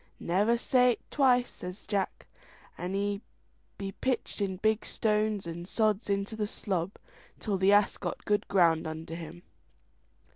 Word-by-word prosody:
"Never 205 +7 +2
say't 250 0 +3
twice," 250 -3 +3
says 180 +3 -8
Jack, 200 -2 -2 0.5
and 180 +2 -4
he 200 0 -1 0.8
pitched 255 -4 -1
in 190 -2 -1
big 220 +2 +1
stones 215 -2 0
and 170 +1 -6
sods 215 0 +1
into 200 +2 -1
the 210 -1 -1
slob, 190 -3 -2 0.4
till 200 -4 -2
the 190 +1 +5
ass 205 0 +4
got 175 -3 -5
good 205 0 +1
ground 165 -5 +3
under 160 +1 -6
him. 165 +1 -8
200 Hz, 140 wpm, -30 LUFS, 180-215 Hz, 0.8 s, the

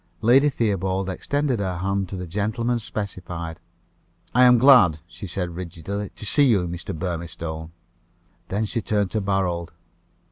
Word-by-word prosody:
Lady 130 +6 +5
Theobald 95 -6 -1
extended 140 +4 -1
her 95 -3 -2
hand 95 +1 -1
to 95 - -5
the 90 -1 -5
gentleman 110 +7 -1
specified. 90 -6 -5 0.7
"I 125 +1 +6
am 125 0 +7
glad," 120 - +6
she 90 +4 -9
said 90 -1 -3
rigidly, 90 +3 -5
"to - - -8
see 140 +2 +4
Mr. 85 -4 -2
Burmistone." 85 -2 -5 0.8
Then 105 +3 -1
she 115 +2 -2
turned 105 -3 0
to 110 - 0
Barold. 95 -4 -1
95 Hz, 140 wpm, -24 LUFS, 85-110 Hz, 0.8 s, am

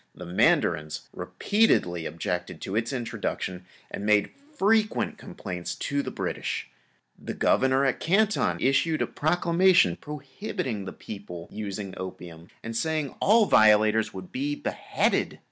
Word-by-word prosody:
The 90 - -9
mandarins 75 -3 +1
repeatedly 90 - +1
objected 80 +1 -4
to 95 - -4
its 115 +1 0
introduction 105 -7 -4 0.3
and - - -5
made 105 -1 +3 0.3
frequent 215 +2 +2
complaints 90 0 -6
to 140 0 -1
the - - -5
British. - - -3 0.5
The - - -6
Governor 130 +1 +3
at 135 - +1
Canton 205 +5 +2
issued 135 +4 +2
a - - 0
proclamation 170 - +3
prohibiting 140 - -5
the 95 - -5
people 90 -6 -9
using 100 -2 -5
opium 85 -3 -8 0.2
and 115 0 -5
saying 155 +3 0
that - - -18
all 220 +1 +5
violators 110 - +5
would 95 -1 -9
be 145 +3 -2
beheaded. - - -1
115 Hz, 130 wpm, -26 LUFS, -, 0.5 s, all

